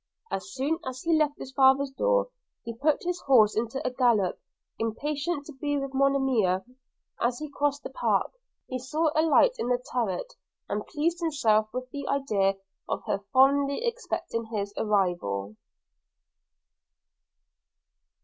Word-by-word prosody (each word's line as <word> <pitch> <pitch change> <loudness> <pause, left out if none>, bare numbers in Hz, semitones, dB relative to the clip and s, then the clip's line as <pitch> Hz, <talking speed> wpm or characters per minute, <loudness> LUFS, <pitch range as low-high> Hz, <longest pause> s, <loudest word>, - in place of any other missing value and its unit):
As 195 0 -4
soon 290 +5 -1
as 260 -1 -6
he 335 - +2
left 300 -2 +1
his 265 - -8
father's 270 +1 +4
door, - - +1 0.3
he 230 - -5
put 290 +5 +1
his 355 0 -2
horse 220 -6 +6
into 235 +4 -2
a 255 - 0
gallop, 235 -7 +2 0.4
impatient 290 +7 -2
to 305 - -10
be 290 +2 -2
with 275 -1 -4
Monimia; 265 -9 +2
and 250 - -23 0.5
as 240 +1 +1
he 305 +1 -6
crossed 285 0 -1
the - - -6
park, - - +1 0.3
he 255 - -4
saw 305 +5 0
a 310 - +3
light 330 +10 +5
in 240 - -1
her 250 - +3
turret, 220 -8 -2 0.3
and 210 +1 -3
pleased 335 +3 -1
himself 225 -10 +2
with 255 +1 -4
the 280 -1 -5
idea 210 -9 +1 0.3
of - - -2
her - - 0
fondly 280 - +3
expecting 470 - -3
his 205 -3 -4
arrival. 175 - 0
265 Hz, 150 wpm, -27 LUFS, 220-290 Hz, 0.5 s, horse